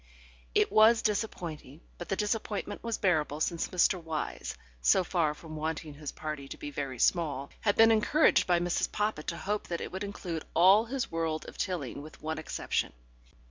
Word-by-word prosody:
It - - +3
was 220 +2 +6
disappointing, 170 - -3 0.2
but 175 - -7
the 195 - +1
disappointment 210 0 -2
was 230 -1 -2
bearable 155 -6 +1
since 165 +1 0
Mr. 180 0 +2
Wyse, 160 -2 -4 0.3
so 65 - +4
far 165 -4 0
from 155 0 -10
wanting 155 0 -3
his 145 0 -6
party 150 -3 -5
to - - -8
be 145 - -6
very 135 -2 -4
small, 145 -3 +1
had 205 -2 +1
been 225 0 +7
encouraged 220 +8 +4
by 175 -1 +4
Mrs. 175 0 0
Poppit 210 -7 -1
to 170 - -2
hope 210 +4 -2
that 170 -1 -3
it - - -5
would 190 +2 -4
include 180 -5 -5
all 190 +6 +6
his 260 +2 -3
world 165 -1 -2
of - - -10
Tilling 160 -8 -3
with 155 +1 -12
one 160 0 -3
exception. 155 - -2
170 Hz, 180 wpm, -30 LUFS, 155-205 Hz, 0.3 s, been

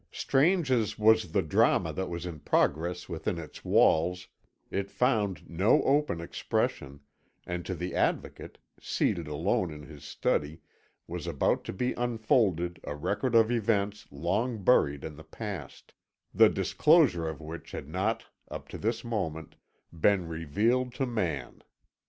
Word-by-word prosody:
Strange 160 +1 +2
as 115 -5 +1
was 110 +1 +4
the 100 -2 +2
drama 80 - +2
that 95 - -3
was 85 0 -5
in 85 -4 -6
progress 85 +5 0
within 85 +2 -3
its 80 -2 -9
walls 90 +3 +3 0.4
it 100 0 -2
found 105 - 0
no 95 +6 +3
open 140 - +2
expression, 70 -4 -2 0.4
and 90 0 -4
to 95 - -2
the 90 +2 -4
Advocate, - - -2 0.2
seated 85 -3 -1
alone 90 +7 0
in 75 -1 -9
his 75 -2 -12
study, 75 +2 -1 0.5
was - - -6
about - - +1
to - - -5
be 125 +7 -1
unfolded 110 - +1
a 75 - -5
record 105 - -1
of 115 0 +5
events 105 -3 0
long 100 - -2
buried 70 - +3
in 75 -2 -7
the 80 - -11
past, 100 +5 -8 0.4
the - - +7
disclosure 140 - +3
of 80 - -7
which 80 +1 -8
had - - -6
not, 95 +8 -1 0.3
up - - -7
to - - -8
this 115 +2 -1
moment, 85 -10 -4 0.4
been 90 +2 +2
revealed 105 - 0
to 135 - 0
man. 85 - -3
95 Hz, 145 wpm, -29 LUFS, 80-115 Hz, 0.5 s, the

